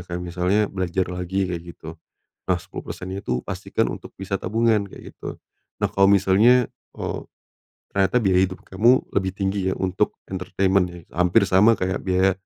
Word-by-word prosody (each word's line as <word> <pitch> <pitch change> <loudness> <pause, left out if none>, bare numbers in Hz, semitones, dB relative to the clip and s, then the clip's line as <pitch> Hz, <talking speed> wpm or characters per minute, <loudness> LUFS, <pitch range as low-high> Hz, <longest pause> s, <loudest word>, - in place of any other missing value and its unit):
kayak 85 0 -4
misalnya 90 +4 +1
belajar 95 -1 -1
lagi 90 +2 -2
kayak 85 -2 -4
gitu, 80 - -9 0.6
nah 90 - +3
10%-nya 95 +3 -7
itu 60 -1 -1
pastikan - - -1
untuk - - -10
bisa 95 +1 -2
tabungan, 110 +1 +2
kayak - - -12
gitu, - - -7 0.4
nah - - +2
kalo 95 0 +4
misalnya, 100 +6 +5 0.3
eee, - - -3 0.8
ternyata 95 +4 +3
biaya 95 -5 +3
hidup 95 -1 -3
kamu 115 +7 +3
lebih 95 -1 +1
tinggi 95 -1 -1
ya - - +1
untuk 95 +2 -1
entertainment 95 +1 +1
ya, 90 - -10 0.2
hampir 90 +5 +4
sama 95 +5 +5
kayak 95 +1 -1
biaya, 95 0 +3
95 Hz, 160 wpm, -23 LUFS, 90-100 Hz, 0.8 s, misalnya